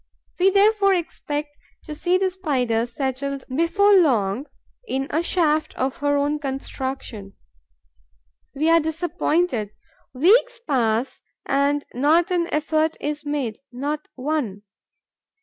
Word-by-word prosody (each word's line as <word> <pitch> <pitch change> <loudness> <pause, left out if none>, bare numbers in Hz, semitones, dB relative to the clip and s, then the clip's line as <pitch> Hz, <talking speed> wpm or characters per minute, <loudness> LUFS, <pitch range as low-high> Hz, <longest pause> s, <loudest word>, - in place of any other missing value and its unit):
We 375 +2 +5
therefore 400 0 +4
expect 295 -3 -4 0.2
to 305 - -7
see 350 +4 +1
the 380 0 0
Spider 250 -11 0
settled 270 +2 -3
before 400 +6 +3
long 260 - +3 0.4
in 270 -7 -1
a 320 - +1
shaft 315 -3 0
of 260 +1 -2
her 285 0 +1
own 290 +1 0
construction. 265 -6 -5 1.2
We 305 +3 0
are 335 - +6
disappointed. 320 - -1 0.4
Weeks 450 - +3
pass 235 -2 0 0.2
and 285 +1 +1
not 320 +8 +3
an 345 -1 0
effort 310 +1 0
is 300 0 -4
made, 275 -7 -2
not 290 +4 -4
one. 255 -8 -2
295 Hz, 115 wpm, -23 LUFS, 265-335 Hz, 1.2 s, are